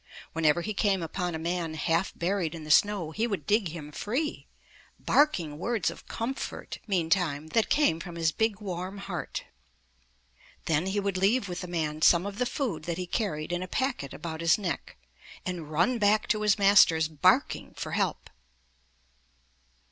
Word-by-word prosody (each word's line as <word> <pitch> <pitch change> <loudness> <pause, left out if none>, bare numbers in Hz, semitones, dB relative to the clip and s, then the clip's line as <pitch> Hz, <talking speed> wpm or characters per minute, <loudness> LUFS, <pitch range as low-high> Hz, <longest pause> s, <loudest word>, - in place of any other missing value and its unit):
Whenever 165 +1 +2
he 215 - -3
came 195 -3 +1
upon 175 +1 -3
a - - -2
man 165 0 -2
half 165 +4 0
buried 175 -2 -1
in 160 - -8
the 155 - -4
snow, 195 -2 +3
he 220 +8 0
would 195 -10 -3
dig 210 +1 +2
him 155 -2 -8
free, 260 - -3 0.5
barking 170 - +2
words 220 -2 0
of - - -13
com 235 +3 -2
fort, - - -6
meantime, 165 -5 0
that 225 +6 +1
came 285 - +3
from 170 0 -8
his 165 -1 +1
big, 220 +4 0
warm 185 -1 -5
heart. 195 -3 -5 1.2
Then 160 +3 +1
he 200 +2 0
would 200 -2 -1
leave 200 +4 +2
with 180 -1 -5
the 180 - -6
man 155 -3 -2
some 170 +3 +5
of 200 0 -5
the 250 - +1
food 235 - -3
that 170 -1 -2
he 180 - -3
carried 175 -5 -2
in 175 0 -1
a 185 - -4
packet 250 - -2
about 160 0 -6
his 165 -1 +4
neck, 185 -6 -4 0.5
and 175 -5 -4
run 175 +11 +1
back 215 +2 +3
to 215 - +2
his 210 -1 +3
masters, 190 -6 +6
barking 155 -2 +1
for - - -5
help. - - -1
180 Hz, 175 wpm, -28 LUFS, 160-205 Hz, 1.2 s, masters